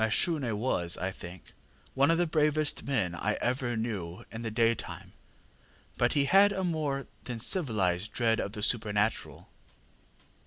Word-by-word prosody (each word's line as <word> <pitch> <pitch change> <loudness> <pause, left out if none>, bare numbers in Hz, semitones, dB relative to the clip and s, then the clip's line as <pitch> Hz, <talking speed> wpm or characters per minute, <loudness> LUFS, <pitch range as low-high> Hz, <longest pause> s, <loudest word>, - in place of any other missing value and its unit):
ŌĆ£Mashune 125 - +2
was, 90 -7 -1
I 95 +1 -2
think, 90 -1 -11 0.4
one 140 +2 +3
of 165 - +3
the 175 - +2
bravest 155 -1 +2
men 110 -11 0
I 105 +5 -1
ever 120 0 -1
knew 100 -7 -4
in 115 - -6
the 115 - -3
daytime, 115 +1 -1 0.8
but 120 0 +1
he 145 -2 +2
had 195 +7 +6
a 190 -1 -2
more 150 -6 -1 0.2
than 120 -2 -4
civilized 105 - +1
dread 115 -2 +1
of 100 - -3
the 105 -2 -5
supernatural. 105 -1 -1
115 Hz, 150 wpm, -29 LUFS, 105-145 Hz, 0.8 s, had